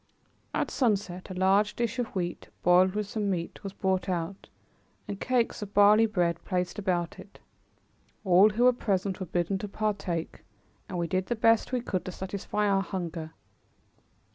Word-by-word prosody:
At - - -1
sunset 200 -7 0
a 185 - -6
large 195 +3 +3
dish 235 +1 -2
of 245 - 0
wheat, 175 -2 -3
boiled 185 +2 +5
with 210 0 -1
some 205 0 -2
meat, 175 +2 -3
was 195 - -5
brought 190 -1 -1
out, 180 +2 -3 0.6
and 200 - -5
cakes 250 -4 0
of 205 -1 -7
barley 210 +2 +6
bread 175 -6 0
placed 180 +2 -2
about 180 -3 -1
it. 190 +2 -13 0.9
All 190 +3 +6
who 220 +3 0
were 250 0 +6
present 195 -4 -1
were 185 - -4
bidden 175 +3 -1
to 210 - -4
partake, 200 -5 -3 0.5
and 185 - -4
we 170 - 0
did 185 +2 -1
the 240 - 0
best 225 +1 +3
we 250 -1 0
could 190 -6 -2
to 185 - -4
satisfy 200 +3 -2
our 195 -1 +3
hunger. 170 -4 -5
195 Hz, 170 wpm, -28 LUFS, 180-210 Hz, 0.9 s, barley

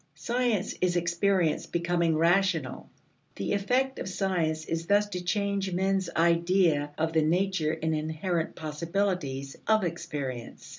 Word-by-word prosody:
Science 235 -5 0
is 180 -1 +2
experience 175 0 +1
becoming 170 -1 +1
rational. 170 -3 +1 0.5
The 100 - -2
effect 250 +7 0
of - - -4
science 170 -5 -1
is 165 +1 -3
thus 205 +1 +3
to 180 -3 -4
change 200 0 -1
men's 190 0 0
idea 170 -2 +3
of 160 +1 0
the 160 - +4
nature 165 -1 +1
and 160 0 +1
inherent 160 +2 -2
possibilities 155 -3 -2
of 220 -2 +4
experience. 150 -8 -5
170 Hz, 130 wpm, -28 LUFS, 160-195 Hz, 0.5 s, the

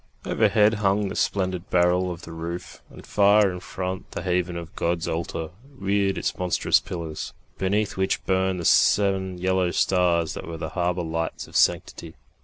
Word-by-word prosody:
Overhead 105 0 +3
hung 100 0 +2
the - - -6
splendid 95 -2 -1
barrel 90 +1 +3
of 85 -1 -7
the 85 - -9
roof, 85 +2 -6
and - - -13
far 100 0 +4
in 90 - -6
front 95 0 -5
the - - -6
haven 90 -1 0
of 85 -1 -8
God's 85 -1 -1
altar 80 0 -3 0.3
reared 100 -2 0
its - - -1
monstrous 90 -1 +2
pillars, 80 -3 -6 0.3
beneath 100 +2 0
which 95 0 0
burned 95 -1 +1
the 85 - -4
seven 95 -1 +3
yellow 95 0 +1
stars 85 -3 +2
that - - -7
were 85 -1 -5
the 80 -1 -4
harbour 90 +1 -1
lights 80 0 -3
of - - -15
sanctity. 80 -1 +1
90 Hz, 170 wpm, -24 LUFS, 85-95 Hz, 0.3 s, far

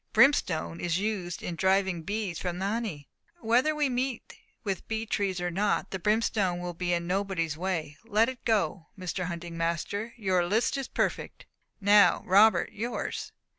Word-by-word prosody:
"Brimstone 175 - +3
is 170 -1 0
used 190 -4 -3
in 175 - -3
driving 190 0 +2
bees 200 -1 -3
from 180 -1 -3
the 190 - -2
honey." 200 -9 -3 0.3
"Whether 255 +5 +2
we 300 -1 +2
meet 255 -1 -2 0.3
with 195 -4 -3
bee 220 0 -2
trees 200 -4 -1
or 175 0 -2
not, 200 +4 0
the 190 - -3
brimstone 210 -2 +1
will 175 0 -4
be 175 +1 -2
in 170 -1 0
nobody's 180 -4 -1
way; 165 -4 -3
let 225 0 +3
it 260 -2 -6
go. 190 -6 0
Mr. 185 0 -3
Hunting 170 -1 -6
master 170 +7 -2
your 190 -5 +1
list 225 +8 +1
is 275 -2 -3
perfect. - - -2 0.3
Now 205 -3 +5
Robert, 205 +4 +5
yours." 230 +3 -4
190 Hz, 165 wpm, -28 LUFS, 175-220 Hz, 0.3 s, Now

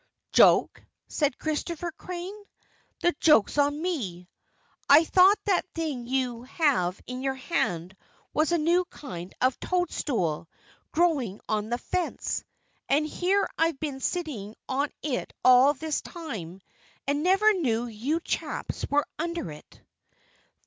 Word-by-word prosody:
"Joke?" - - +5 0.3
said 290 -2 0
Christopher 335 +2 -3
Crane. 360 +3 -6 0.7
"The 350 - +3
joke's 295 -3 +4
on 290 +1 +2
me. 220 - -3 0.6
I 290 +3 +9
thought 375 +5 +6
that 375 -2 +1
thing 295 -8 -3
you 250 -2 -1
have 250 - +1
in 250 0 -6
your 265 0 -1
hand 185 - -2 0.4
was 310 +1 +2
a 345 - +3
new 340 +3 +3
kind 180 - -8
of 255 0 +2
toadstool, 230 - -1 0.4
growing 295 - +1
on 215 0 -1
the 240 - 0
fence. 350 +7 -2 0.5
And 290 +3 +3
here 380 +5 +1
I've 325 -4 +2
been 290 -4 -4
sitting 265 - -3
on 280 +2 0
it 280 -4 -2
all 255 +3 +7
this 310 +2 -2
time 195 - -7 0.4
and 285 +1 0
never 390 +5 +4
knew 245 - 0
you 245 +9 -2
chaps - - -3
were 290 0 +2
under 335 - -3
it!" 150 - -14
290 Hz, 130 wpm, -27 LUFS, 240-335 Hz, 0.7 s, I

